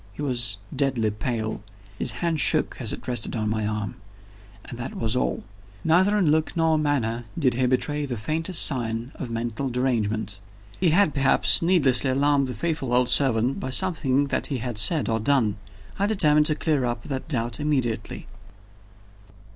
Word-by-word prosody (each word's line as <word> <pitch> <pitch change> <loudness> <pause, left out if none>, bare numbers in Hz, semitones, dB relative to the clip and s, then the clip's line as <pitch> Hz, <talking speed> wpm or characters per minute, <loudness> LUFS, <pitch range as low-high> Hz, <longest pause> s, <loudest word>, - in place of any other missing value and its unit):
He 145 - -7
was 120 -6 -1 0.2
deadly 130 -6 0
pale; 110 +1 -4 0.4
his - - +1
hand 170 -2 -2
shook - - +2
as - - 0
it - - -6
rested 120 -3 -1
on 110 -2 -1
my 110 -1 -1
arm 105 -1 -4 0.7
and - - -8
that 120 - -5
was 115 +1 -1
all. 125 - -1 0.4
Neither 190 +6 +3
in 175 -7 +2
look 160 +2 0
nor 160 -1 +2
manner 120 -6 -1
did 135 -6 +2
he 125 +1 0
betray 145 +3 -1
the 125 -3 -4
faintest 160 - +2
sign 120 -2 0
of 130 - -7
mental 115 +3 -3
derangement. 110 -5 -1 0.4
He 180 - +3
had 175 0 +3
perhaps 135 -1 +3
needlessly 140 -7 +3
alarmed 140 +1 +2
the 125 - -5
faithful 150 -7 -2
old 125 0 +3
servant 125 -1 +3
by 130 - -4
something 140 -3 0
that - - -1
he 140 - -3
had 120 -2 -4
said 155 - +3
or 110 -1 0
done. 110 -4 +1 0.4
I 200 - +2
determined 150 -8 +3
to 155 - +2
clear 150 -4 0
up 120 -1 -3
that 135 -4 -5
doubt 120 -4 -2
immediately. 130 -7 -2
130 Hz, 170 wpm, -24 LUFS, 115-150 Hz, 0.7 s, Neither